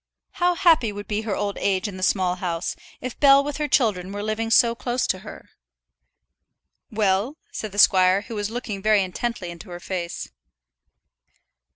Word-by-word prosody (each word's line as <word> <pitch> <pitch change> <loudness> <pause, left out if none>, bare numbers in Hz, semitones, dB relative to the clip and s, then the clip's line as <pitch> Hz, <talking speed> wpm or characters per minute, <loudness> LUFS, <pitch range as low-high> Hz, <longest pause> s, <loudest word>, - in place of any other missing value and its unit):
How 355 -1 +1
happy 325 - +4
would 205 0 -8
be 210 0 -1
her 215 -3 -3
old 205 -1 -3
age 190 +1 0
in 200 - -7
that - - -8
Small 185 -1 +1
House, 175 -2 -3 0.3
if 255 -2 -6
Bell 275 -1 +6
with 290 0 -4
her 300 -1 -1
children 205 -9 +1
were 205 +1 -5
living 215 +1 -2
so 235 0 +5
close 245 +1 -2
to 185 - -1
her! - - -12 1.4
"Well?" 210 +6 0
said 215 - -5
the 200 - -10
squire, 185 -1 +5
who 220 - -9
was 205 -1 -2
looking 220 -4 -5
very 215 -1 +3
intently 185 0 -4
into 170 +3 -11
her 175 0 -7
face. 175 -1 -5
205 Hz, 175 wpm, -23 LUFS, 185-240 Hz, 1.4 s, Bell